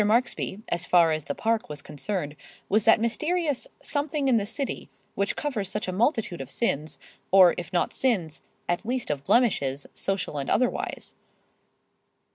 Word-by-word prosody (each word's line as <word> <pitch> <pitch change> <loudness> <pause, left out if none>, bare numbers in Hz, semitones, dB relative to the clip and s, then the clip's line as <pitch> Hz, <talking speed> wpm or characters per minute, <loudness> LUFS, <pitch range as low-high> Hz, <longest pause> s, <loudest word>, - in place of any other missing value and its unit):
Marksby, 215 -2 0
as 175 0 -1
far 170 -2 +5
as 155 -1 -1
the - - -3
Park 225 -4 0
was 145 -1 -7
concerned, 150 0 -4 0.3
was 215 +1 +3
that 225 - +6
mysterious 305 +5 0 0.2
"something 290 -1 -1
in 250 -3 +5
the 205 -2 -1
city" 275 +5 -4 0.2
which 200 0 0
covers 225 -11 -2
such 210 -1 -3
a - - -1
multitude 215 - 0
of 135 - -7
sins, 155 -6 -1 0.3
or 185 -2 +7
if 175 -3 -6
not 175 - +1
sins, 190 - 0 0.3
at 175 +2 0
least 245 -4 -2
of 140 -2 -3
blemishes, 140 - +2
social 195 -6 -2
and 135 - -3
otherwise. 250 - 0
200 Hz, 160 wpm, -26 LUFS, 165-240 Hz, 0.3 s, or